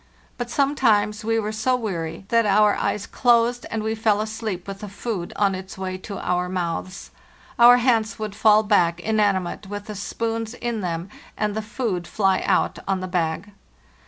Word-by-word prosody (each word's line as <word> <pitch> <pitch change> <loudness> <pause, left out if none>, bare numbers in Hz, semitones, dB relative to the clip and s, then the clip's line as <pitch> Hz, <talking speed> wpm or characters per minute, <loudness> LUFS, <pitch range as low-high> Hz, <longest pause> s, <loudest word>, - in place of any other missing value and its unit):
But 245 -1 -5
sometimes 230 -6 +2
we 225 +1 +1
were 215 -1 -1
so 220 +4 +1
weary 190 -7 -4
that 230 -2 +3
our 205 +1 +5
eyes 210 - -1
closed, 240 0 +2
and 220 -1 -3
we 220 0 -1
fell 220 -2 +1
asleep 215 -4 -4
with 195 0 -6
the 210 - -7
food 200 -3 -4
on 200 -1 +2
its 190 +1 -7
way 185 -1 -4
to 200 +1 -7
our 180 0 -1
mouths. 185 +1 -4 0.5
Our 240 +1 +9
hands 230 -3 +1
would 215 -2 -4
fall 215 0 +5
back 175 -5 +2
inanimate 200 -2 0
with 205 +1 -6
the 215 - -6
spoons 225 +3 -3
in 235 -3 -3
them 170 0 -3 0.3
and 210 -1 0
the 220 - -1
food 215 -6 -3
fly 195 -3 +1
out - - +1
on 190 -1 0
the 185 - -4
bag. 180 +2 -2
210 Hz, 180 wpm, -23 LUFS, 190-225 Hz, 0.5 s, Our